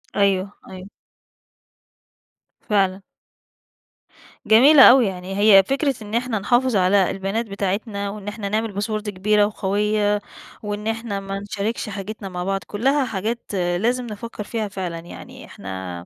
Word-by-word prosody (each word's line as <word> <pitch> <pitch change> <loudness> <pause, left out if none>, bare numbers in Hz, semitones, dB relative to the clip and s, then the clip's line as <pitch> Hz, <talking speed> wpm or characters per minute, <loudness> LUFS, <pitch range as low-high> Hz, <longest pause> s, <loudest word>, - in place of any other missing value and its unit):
أيوه، 195 -1 +1 0.2
أيوه. 185 0 -9 1.7
فعلًا. 195 -3 0 1.4
جميلة 265 +6 +7
أوي، 255 -1 +6
يعني 190 0 -5
هي 205 -2 +7
فكرة 275 +4 0
إن 210 +1 -6
إحنا 235 -2 -1
نحافظ 240 +4 +1
على 190 0 +3
البيانات 195 +4 -3
بتاعتنا، 200 0 -3
وإن 205 0 -8
إحنا 210 -1 -4
نعمل 215 -1 -2
Password 215 0 -2
كبيرة 205 +2 +2
وقوية، 205 +1 0 0.4
وإن 210 +1 -4
إحنا 225 -2 -3
ما 195 0 -5
نشاركش 205 +2 -4
حاجتنا 200 0 -6
مع 180 -1 -5
بعض، 195 +1 -1
كُلّها 270 +6 +1
حاجات 225 +1 -3
لازم 200 +7 0
نفكر 215 0 -7
فيها 220 0 -3
فعلًا، 185 -4 -5
يعني 170 +1 -11
إحنا 95 -2 -8
205 Hz, 130 wpm, -21 LUFS, 195-220 Hz, 1.7 s, جميلة